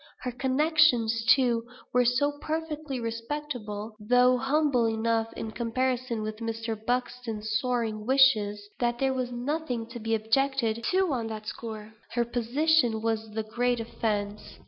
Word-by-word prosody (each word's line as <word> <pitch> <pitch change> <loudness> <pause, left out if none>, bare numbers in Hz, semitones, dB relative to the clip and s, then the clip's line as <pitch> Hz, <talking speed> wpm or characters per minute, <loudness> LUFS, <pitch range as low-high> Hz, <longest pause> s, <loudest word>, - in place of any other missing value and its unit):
Her 250 - -3
connections, 260 -3 +3
too, 240 -3 +4 0.3
were 250 0 +4
so 260 +4 +3
perfectly 310 -3 -3
respectable 230 -3 -4
(though 250 +4 +4
humble 270 -3 +2
enough 225 0 0
in 220 - -5
comparison 240 +1 -1
with 215 0 -4
Mr. 225 0 -3
Buxton's 225 -2 -2
soaring 230 -4 -2
wishes), 215 -7 +4
that 240 -1 +1
there 265 +1 +1
was 255 -1 -2
nothing 250 -1 -2
to 240 - -6
be 225 0 0
objected 230 0 +1
to 370 -4 +2
on 235 -3 -2
that 215 -1 -6
score; 220 -1 -7 0.2
her 240 0 +1
position 240 0 +2
was 225 -1 -1
the 220 - -1
great 240 +2 0
offence. 210 -2 -3
235 Hz, 140 wpm, -28 LUFS, 220-260 Hz, 0.3 s, too